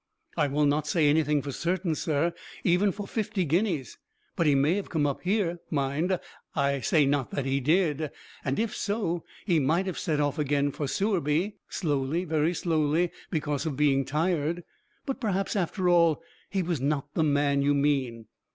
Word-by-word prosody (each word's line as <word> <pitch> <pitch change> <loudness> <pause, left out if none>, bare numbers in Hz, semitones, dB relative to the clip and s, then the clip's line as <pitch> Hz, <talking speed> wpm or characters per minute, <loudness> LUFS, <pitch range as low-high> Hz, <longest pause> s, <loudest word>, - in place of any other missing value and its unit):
"I 145 - +2
will 145 +2 +1
not 145 +1 +1
say 155 -2 +3
anything 150 -1 +2
for 140 - -4
certain, 170 +3 -1
sir; 160 +1 0 0.3
even 185 +3 +3
for 200 +1 -6
fifty 210 -4 -1
guineas. 165 - 0 0.4
But 165 - +1
he 145 - +5
may 140 +4 +3
have 205 - -4
come 155 -3 +1
up 140 -2 -1
here 180 -3 0
mind, 155 +6 0 0.4
I 140 -2 +1
say 150 +3 +3
not 140 -2 +1
that 140 - -3
he 135 +1 +1
did 155 +1 +1 0.3
and 135 0 -1
if 225 -1 -1
so, 200 -5 -1 0.2
he 175 -5 +3
might 160 +7 +2
have 185 -3 -3
set 150 -2 0
off 145 0 0
again 145 -1 +1
for 145 +1 -3
Sewerby. 185 +1 0
Slowly, 150 0 -1
very 160 +1 +1
slowly, 160 +1 +1 0.2
because 150 -2 -1
of 140 -4 -3
being 140 -2 +3
tired. 160 +3 0 0.4
But 270 -1 -3
perhaps, 195 -4 -1
after 185 0 0
all, 170 -2 +4 0.3
he 195 -2 0
was 170 -6 -2
not 145 0 -1
the 160 - +1
man 145 -1 +2
you 145 +1 +3
mean." 135 -5 0
155 Hz, 180 wpm, -27 LUFS, 145-175 Hz, 0.4 s, he